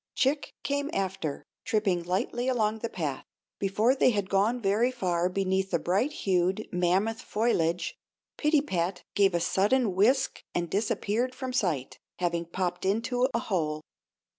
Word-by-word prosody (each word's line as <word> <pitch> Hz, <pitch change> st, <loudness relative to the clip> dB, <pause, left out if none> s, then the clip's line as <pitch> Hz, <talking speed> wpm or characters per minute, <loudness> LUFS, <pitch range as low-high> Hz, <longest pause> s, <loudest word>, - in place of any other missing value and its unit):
Chick 285 Hz, +3 st, 0 dB
came 285 Hz, +1 st, -1 dB
after, 185 Hz, -6 st, -2 dB, 0.2 s
tripping 210 Hz, -6 st, +1 dB
lightly 200 Hz, +8 st, -1 dB
along 220 Hz, -4 st, +1 dB
the 230 Hz, -, -3 dB
path. 150 Hz, -7 st, -3 dB, 0.4 s
Before 210 Hz, +5 st, +2 dB
they 265 Hz, -, +4 dB
had 205 Hz, -4 st, -1 dB
gone 210 Hz, +5 st, +2 dB
very 215 Hz, +3 st, +2 dB
far 180 Hz, -8 st, 0 dB
beneath 190 Hz, 0 st, 0 dB
the 170 Hz, -, +2 dB
bright 195 Hz, -, +1 dB
hued, 190 Hz, -, 0 dB
mammoth 190 Hz, +6 st, +1 dB
foliage 175 Hz, -7 st, 0 dB, 0.4 s
Pittypat 195 Hz, -, 0 dB
gave 195 Hz, -3 st, +3 dB
a -, -, +2 dB
sudden 205 Hz, +5 st, +2 dB
whisk 245 Hz, +8 st, +2 dB
and 170 Hz, -2 st, -1 dB
disappeared 220 Hz, +4 st, 0 dB
from 260 Hz, -1 st, -4 dB
sight, 165 Hz, -, -1 dB, 0.2 s
having 170 Hz, -1 st, -1 dB
popped 175 Hz, +1 st, -3 dB
into 235 Hz, +6 st, +1 dB
a -, -, +2 dB
hole. 155 Hz, -6 st, -1 dB
195 Hz, 140 wpm, -28 LUFS, 180-240 Hz, 0.4 s, they